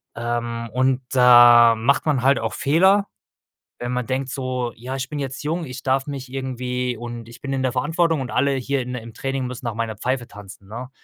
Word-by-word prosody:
Ähm, 115 0 -3
und 130 0 +1
da 120 -2 +8
macht 130 +8 +1
man 140 -5 +1
halt 135 -1 +4
auch 115 0 -3
Fehler, 190 +7 +3 0.7
wenn 120 0 -4
man 125 -1 -2
denkt 130 +2 -2
so: 130 -3 -3
„Ja, 130 +3 -6
ich 130 0 -4
bin 150 - -4
jetzt 135 +1 -5
jung, 165 +2 -2
ich 130 0 -8
darf 135 0 +1
mich 135 -3 -6
irgendwie 125 -2 -3
und 120 0 -7
ich 115 - -14
bin 140 - -5
in 130 - -1
der 130 - +1
Verantwortung 160 +3 +1
und 130 - -5
alle 140 +2 +2
hier 135 +1 -1
in 125 +1 -5
im 115 -1 -8
Training 135 +1 -3
müssen 125 0 -8
nach 115 - -2
meiner 110 -2 -3
Pfeife 125 +1 -2
tanzen“, 100 -2 -13
ne? 125 +4 -7
125 Hz, 210 wpm, -22 LUFS, 120-135 Hz, 0.7 s, da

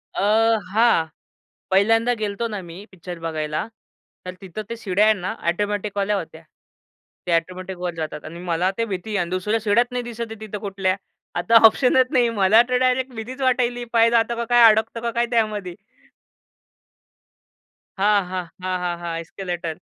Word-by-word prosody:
अ, - - -1 0.5
हां, 225 -7 +4 0.7
पहिल्यांदा 225 +5 +3
गेलतो 210 +2 -2
ना 210 -3 -5
मी 175 +3 -11
पिक्चर 180 -1 -9
बघायला, 155 -1 -3 0.6
तर 180 - -5
तिथं 190 +2 -7
ते 230 - -4
शिड्या 205 -2 +1
आहेत 215 0 +4
ना, 185 +4 -3 0.2
ऑटोमॅटिकवाल्या 205 +1 -1
होत्या. 160 -3 -7 0.9
ते - - 0
ऑटोमॅटिक 185 +2 -3
वर 175 0 -3
जातात 155 -2 -5
आणि 165 +2 -8
मला 175 +3 +1
ते 230 - 0
भीती 195 -1 -5
आहे. 210 - -1
आणि 175 -3 -1
दुसऱ्या 185 +5 -1
शिड्या 220 +2 +4
नाही 250 0 -2
दिसत 235 -1 -7
आहे 225 - -8
तिथं 215 -1 -6
कुठल्या, 190 -1 0 0.4
आता 230 - +2
ऑप्शनच 255 +3 +5
नाही. 245 -3 +3
मला 215 0 +5
तर 250 - +2
डायरेक्ट 255 0 +1
भीतीच 250 +5 -7
वाटायली, 245 -2 +1
पाय 230 0 +5
जातं 235 0 +2
का 235 0 -3
काय, 240 -1 +6
अडकतं 220 +2 -1
का 235 0 -2
काय 235 +1 +1
त्यामध्ये. 210 -5 -1 2.2
हां, 205 -1 +3
हां. 180 0 -4 0.2
हां, 185 0 -1
हां, 175 -1 -2
हां. 170 -1 -4
एस्केलेटर, 170 -1 -5
205 Hz, 165 wpm, -22 LUFS, 180-230 Hz, 2.2 s, काय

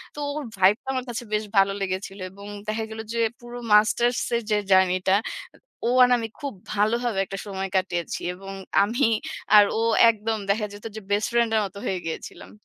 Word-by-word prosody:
তো - - -7 0.2
ওর 300 - -3
ভাইবটা 205 +8 +3
আমার 255 0 -2
কাছে 240 +1 -4
বেশ 210 0 +1
ভালো 195 0 +5
লেগেছিল। 195 +1 -4
এবং 200 +1 -12 0.2
দেখা 220 +1 -1
গেল 220 - -7
যে 235 - -1 0.2
পুরো 240 0 -9 0.2
মাস্টার্স 235 +3 +4 0.2
এর 235 - +1
যে 210 - +4
জার্নি 185 -1 +5
টা 190 - +5 0.7
ও - - +2
আর 250 - +2
আমি 225 -1 -4
খুব 280 -2 -4 0.2
ভালোভাবে 220 +1 +1
একটা 195 +1 -7
সময় 195 -1 -4
কাটিয়েছি। 175 -2 -1
এবং 195 +1 -9 0.3
আমি 235 +5 +1 0.5
আর 205 - +9 0.2
ও - - +1 0.3
একদম 220 0 -2
দেখা 210 +1 +1
যেত 205 - -12
যে - - -5
বেস্ট 205 +1 +1
ফ্রেন্ড 235 -1 +2
এর - - +4
মতো 195 +1 -10
হয়ে 185 - -1
গিয়েছিলাম। 160 - -7
210 Hz, 190 wpm, -24 LUFS, 195-235 Hz, 0.7 s, আর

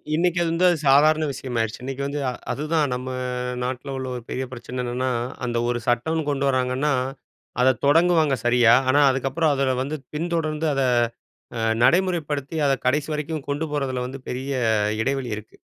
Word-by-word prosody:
இன்னக்கி 175 +1 +1
அது 165 - +1
வந்து 175 +2 +2
அது 175 - +2
சாதாரண 155 +3 +5
விஷயமாயிருச்சு. 120 -4 -3
இன்னக்கி 135 +1 -4
வந்து 145 +1 -3
அ - - -1 0.2
அதுதான் 150 0 0
நம்ம 125 +1 -4 0.5
நாட்ல 130 +2 -4
உள்ள 130 0 -4
ஒரு 120 - -6
பெரிய 130 +1 -2
பிரச்சன 125 0 -6
என்னன்னா, 125 +2 -1 0.4
அந்த 120 -1 -1
ஒரு 120 0 0
சட்டம்ன்னு 155 +7 +1
கொண்டு 140 -1 0
வராங்கன்னா, 130 +3 +1 0.7
அத 130 0 +4
தொடங்குவாங்க 160 -2 +4
சரியா, 120 -1 +5 0.2
ஆனா, 145 +2 +5
அதுக்கப்பறம் 140 +4 0
அதில 135 -1 +1
வந்து 150 +3 -3 0.2
பின்தொடர்ந்து, 160 -1 -1
அத 135 - 0 0.8
அ - - -3 0.2
நடைமுறைப்படுத்தி 165 -5 +1
அத 135 - +3
கடைசி 145 +3 +1
வரைக்கும் 150 -1 -4
கொண்டு 145 +3 -1
போறதில 130 -3 -1
வந்து 130 0 -8
பெரிய 130 +2 -4 0.5
இடைவெளி 135 -2 -2
இருக்கு. 110 - -12
140 Hz, 160 wpm, -23 LUFS, 130-155 Hz, 0.8 s, சாதாரண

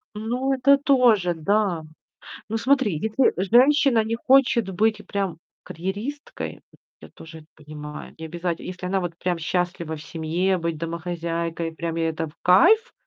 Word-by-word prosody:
Ну 245 +5 -1
это 275 +2 +4
тоже, 245 -10 +3
да. 180 0 0 0.7
Ну, 225 - -1
смотри, 255 - +2
если 220 - +1
женщина 245 +5 +4
не 225 +1 -2
хочет 240 -4 +3
быть 215 +2 0
прям 195 -5 -3 0.3
карьеристкой, 205 - -6 0.4
я - - -12
тоже 160 0 -12
это 155 - -18
понимаю. 150 0 -9
Не 160 - -7
обязать 170 +1 -3
если 180 0 -6
она 195 +1 0
вот 175 -2 -4
прям 180 -1 -1
счастлива 170 0 -2
в 150 - -10
семье, 170 +4 -1
быть 165 -2 -3
домохозяйкой, 170 0 -3
прям 165 0 -4
ей 165 0 +1
это 160 0 -3
в 150 - -15
кайф. 420 - +5
180 Hz, 150 wpm, -23 LUFS, 165-230 Hz, 0.7 s, кайф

